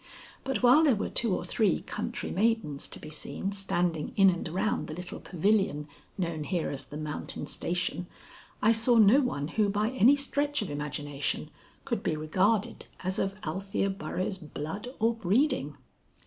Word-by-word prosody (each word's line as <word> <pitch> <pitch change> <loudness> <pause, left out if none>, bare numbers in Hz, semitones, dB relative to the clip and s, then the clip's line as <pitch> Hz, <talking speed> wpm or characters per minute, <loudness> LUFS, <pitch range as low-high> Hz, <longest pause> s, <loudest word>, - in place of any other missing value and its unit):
But 270 -1 -2
while 255 +6 +7
there 280 -7 +5
were 205 - -2
two 230 -3 +1
or - - -4
three 210 -6 +2
country - - -4
maidens 205 -9 0
to - - -4
be 155 - -9
seen 190 +5 -4
standing 175 -5 -1
in 195 -1 +7
and 175 -2 -4
around 190 +6 -1
the 155 - -6
little 180 +1 -7
pavilion 185 -5 +1 0.3
known 170 -4 -2
here 170 +1 -1
as 135 -1 -5
the 150 - -8
Mountain 150 -1 -4
station, 175 0 -2 0.6
I 220 - +6
saw 230 +1 +3
no 220 +5 +7
one 145 - -2
who 210 +3 +2
by 210 +3 0
any 260 +2 +6
stretch 285 -1 -1
of 195 - -6
imagination 145 -1 -3 0.3
could - - -1
be - - 0
regarded 195 +9 0 0.2
as 185 +1 -1
of 195 0 -1
Althea 195 +4 -1
Burroughs' 185 +2 -3
blood 160 +7 -6
or 225 +1 +2
breeding. 225 - +1
195 Hz, 165 wpm, -29 LUFS, 155-225 Hz, 0.6 s, while